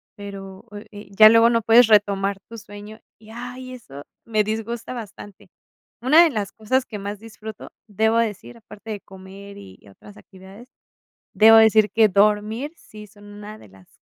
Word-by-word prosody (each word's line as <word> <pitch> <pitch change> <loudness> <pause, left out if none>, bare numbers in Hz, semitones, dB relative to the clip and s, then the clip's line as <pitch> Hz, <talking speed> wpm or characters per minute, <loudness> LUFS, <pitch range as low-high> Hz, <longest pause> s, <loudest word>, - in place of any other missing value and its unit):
pero, 195 -2 -11
oh, 205 - -10
eh, 205 -1 -12
ya 215 +2 +8
luego 230 +1 +4
no 230 -1 0
puedes 230 +1 +5
retomar 200 -2 +1
tu 230 - -10
sueño, 210 0 -12 0.2
y, 215 0 -19
ay, 250 +2 -9
eso 145 - -12 0.2
me 215 -2 0
disgusta 225 +3 -5
bastante. 205 -4 -12 0.5
Una 300 +7 +5
de 340 - +2
las 205 -5 -5
cosas 255 +4 -2
que 215 - -9
más 200 +1 -7
disfruto, 220 -1 -11 0.2
debo 220 +2 0
decir, 225 +1 -4
aparte 220 0 -13
de 205 -2 -7
comer 195 +1 -14
y 95 -1 -15
otras 200 - -17
actividades, 195 +5 -16 0.7
debo 225 +1 +6
decir 220 -1 +4
que 220 -1 +3
dormir, 210 - 0
sí 210 -8 -15
son 205 +1 -20
una 205 +1 -12
de - - -18
las 95 -1 -21
215 Hz, 170 wpm, -21 LUFS, 200-225 Hz, 0.7 s, ya